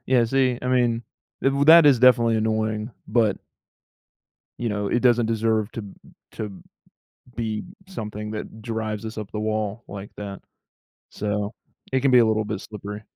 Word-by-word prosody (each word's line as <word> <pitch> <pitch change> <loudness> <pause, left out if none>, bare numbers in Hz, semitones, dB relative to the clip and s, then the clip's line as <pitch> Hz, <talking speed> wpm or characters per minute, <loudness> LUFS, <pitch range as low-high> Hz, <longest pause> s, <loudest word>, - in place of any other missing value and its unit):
Yeah, 125 -2 +4
see, 130 0 +1
I 125 - -2
mean, 120 -2 +2 0.4
w 140 +1 +2
that 165 0 +9
is 135 -4 +6
definitely 120 -2 +5
annoying, 110 +1 -1 0.2
but 110 -3 +2 1.2
you 120 - -1
know, 105 -1 -2
it 120 - +1
doesn't 120 -2 +4
deserve 110 -1 0
to 115 - -5 0.5
to 105 -3 -7 0.7
be 110 -2 -2 0.2
something 105 - -6
that 110 +1 -7
drives 110 -1 -3
us 110 - -7
up 105 -2 -6
the 105 - -3
wall 110 0 -2
like 100 0 -8
that. 100 -2 -7 0.7
So, 105 0 -3 0.4
it 130 - +2
can 135 0 +3
be 125 - +7
a 115 - +6
little 110 0 +1
bit 105 -2 -4
slippery. 105 0 -8
110 Hz, 160 wpm, -24 LUFS, 105-120 Hz, 1.2 s, that